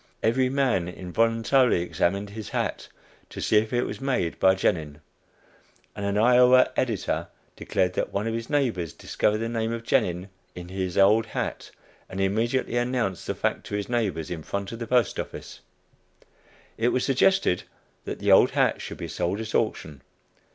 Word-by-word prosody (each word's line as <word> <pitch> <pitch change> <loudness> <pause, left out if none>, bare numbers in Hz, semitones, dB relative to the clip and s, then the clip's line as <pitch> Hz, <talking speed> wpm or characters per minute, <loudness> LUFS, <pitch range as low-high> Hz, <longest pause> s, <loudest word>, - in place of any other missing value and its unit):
Every 125 +3 +2
man 130 -10 +1
involuntarily 115 +4 +1
examined 100 +3 -1
his 110 -1 -7
hat, - - -3 0.4
to - - -9
see 105 - +2
if 110 +1 +1
it 120 0 +1
was - - -6
made 125 -11 -1
by 95 0 +5
Genin; 80 -5 -1 1.0
and 100 - -5
an 100 +1 0
Iowa 125 +3 +5
editor 115 -6 -1 0.3
declared 90 -1 -1
that - - -2
one 100 +2 -2
of 115 - -1
his 115 0 -4
neighbors 115 - 0
discovered 105 0 0
the 115 +1 -2
name 115 -1 -2
of 115 0 -4
Genin 90 -3 0 0.3
in 90 0 -8
his 95 -1 -3
old 105 +3 +5
hat - - -4 0.4
and 95 - -6
immediately 115 +6 0
announced 120 -6 -1
the - - -2
fact - - -1
to 105 - -4
his 100 0 -3
neighbors 100 -11 -1
in 85 -2 -4
front 100 +4 -4
of 115 - -7
the 115 - -5
Post 125 -3 +2
Office. - - -7 1.2
It 115 - +2
was 125 +1 +1
suggested 135 - +2 0.4
that - - -4
the - - +1
old - - +7
hat - - +1
should - - -7
be - - -5
sold 90 +4 -2
at 110 0 -5
auction. 80 -10 -1
110 Hz, 170 wpm, -25 LUFS, 95-120 Hz, 1.2 s, old